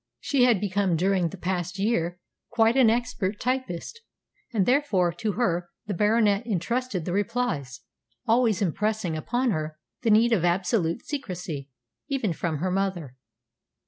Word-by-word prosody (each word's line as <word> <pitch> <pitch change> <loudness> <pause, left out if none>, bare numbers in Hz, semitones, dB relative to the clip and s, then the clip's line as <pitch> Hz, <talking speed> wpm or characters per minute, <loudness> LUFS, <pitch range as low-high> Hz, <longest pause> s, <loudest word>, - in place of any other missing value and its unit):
She 265 -3 +2
had 235 -6 +4
become 200 -2 +1
during 185 0 +1
the 195 - -9
past 180 +1 -3
year 180 -4 0 0.3
quite 230 0 +3
an 260 -4 +6
expert 225 -4 -1
typist, 255 - -3 0.5
and 210 -6 +1
therefore 240 - +2
to 210 +4 -2
her 180 -7 0 0.2
the 205 - -3
Baronet 210 +2 +3
entrusted 220 -1 -1
the 175 - -2
replies, 205 - -1 0.4
always 225 -4 +3
impressing 200 -1 -1
upon 240 +10 0
her 155 -3 -3 0.2
the 230 - +1
need 225 +2 +5
of 185 -7 +2
absolute 175 0 +1
secrecy, 180 - -5 0.4
even 260 - -1
from 160 -1 -2
her 180 +5 -1
mother. 180 -8 -2
200 Hz, 145 wpm, -26 LUFS, 175-235 Hz, 0.5 s, an